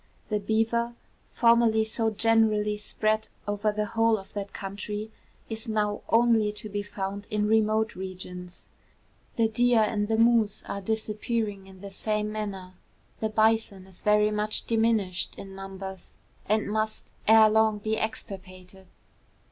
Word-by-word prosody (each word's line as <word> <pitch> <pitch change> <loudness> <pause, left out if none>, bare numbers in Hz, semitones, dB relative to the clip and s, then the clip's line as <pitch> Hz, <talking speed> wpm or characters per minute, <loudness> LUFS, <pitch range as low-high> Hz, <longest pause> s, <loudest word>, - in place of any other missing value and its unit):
The 210 -1 0
beaver, 225 +3 0 0.4
formerly 230 -2 +4
so 220 0 0
generally 215 -1 +2
spread 215 +1 -1 0.2
over 205 +1 0
the 210 0 -1
whole 225 +1 +2
of 195 - -12
that 200 -1 -5
country, 205 +2 -5 0.4
is 225 0 -6
now 210 -1 0
only 225 -2 +4
to 210 +1 -5
be 205 0 -2
found 200 0 -5
in 210 -2 0
remote 220 0 +2
regions. 180 -1 -8 0.7
The 230 -1 +3
deer 240 +1 +3
and 210 -1 0
the 220 0 +1
moose 230 -3 +3
are 200 - -5
disappearing 215 -1 -2
in 190 -1 -14
the 200 -1 -8
same 210 +1 -1
manner. 195 -4 -5 0.5
The 220 - -1
bison 215 -3 +1
is 190 -1 -12
very 210 0 +3
much 210 0 -1
diminished 220 -6 +1
in 195 -1 -9
numbers, 195 -1 -8 0.3
and 215 +1 +1
must 215 0 -1 0.2
ere 220 0 +8
long 220 -1 +3
be 215 +1 -1
extirpated. 190 -3 -7
215 Hz, 140 wpm, -27 LUFS, 200-220 Hz, 0.7 s, ere